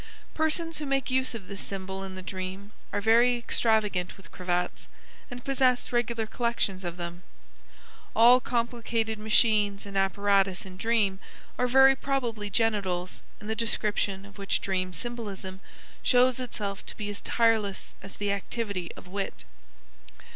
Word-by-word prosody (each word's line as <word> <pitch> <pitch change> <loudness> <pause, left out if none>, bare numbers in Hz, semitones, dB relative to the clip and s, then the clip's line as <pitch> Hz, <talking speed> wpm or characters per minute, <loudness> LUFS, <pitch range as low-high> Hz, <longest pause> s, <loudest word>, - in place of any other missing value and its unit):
Persons 320 +1 0
who 300 - -4
make 270 -1 0
use 260 -1 +1
of 200 -5 -8
this 200 -1 -7
symbol 190 0 -5
in 190 -1 -7
the 185 - -7
dream 190 +2 -6 0.2
are 205 - -1
very 235 +3 +5
extravagant 215 -6 0
with 195 - -15
cravats, 180 -1 -2 0.4
and 245 0 -8
possess 260 -2 +2
regular 235 -1 0
collections 220 -4 -1
of 175 -1 -4
them. 175 0 -6 0.9
All 240 +3 +8
complicated 230 -2 -1
machines 210 -2 +3
and 200 -1 -9
apparatus 195 -1 +2
in 185 -1 -10
dream 205 -2 +1 0.4
are 250 - +1
very 265 +2 +7
probably 240 -7 -2
genitals, 195 -5 0 0.2
in 210 - -11
the 220 +1 -2
description 210 -4 0
of 200 +1 -14
which 195 -1 +1
dream 185 -1 -1
symbolism 200 -4 -5 0.4
shows 250 0 +4
itself 210 -5 -4
to - - -4
be 205 -1 -3
as 205 - -6
tireless 225 -4 +1
as 195 - -10
the 205 -1 0
activity 200 -2 -3
of - - -12
wit. 195 +1 -4
210 Hz, 145 wpm, -28 LUFS, 195-235 Hz, 0.9 s, All